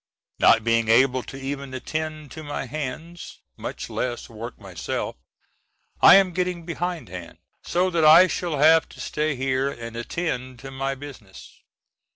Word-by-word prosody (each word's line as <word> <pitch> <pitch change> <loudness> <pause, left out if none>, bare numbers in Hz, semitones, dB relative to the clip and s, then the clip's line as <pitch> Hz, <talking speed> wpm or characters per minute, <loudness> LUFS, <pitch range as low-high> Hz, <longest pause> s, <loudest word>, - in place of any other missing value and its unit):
Not 115 - +5
being 115 0 +2
able 130 +3 +4
to 135 - -9
even 135 0 -5
attend 155 +2 -4
to 160 - -8
my 145 -2 -4
hands, 155 +6 -6 0.2
much - - -6
less 120 -1 -3
work 115 +1 -8
myself, 95 -5 -4 0.9
I - - +10
am 190 -2 +4
getting 180 -1 -2
behindhand, 160 - -5 0.3
so 185 +1 +1
that 165 -2 +1
I 160 +4 +9
shall 175 -4 -2
have 160 +3 +5
to - - -15
stay 150 -1 -1
here 130 +1 0
and 115 -3 -8
attend 130 0 -3
to 135 0 -8
my 135 +1 -2
business. 130 -9 -12
140 Hz, 150 wpm, -24 LUFS, 125-160 Hz, 0.9 s, I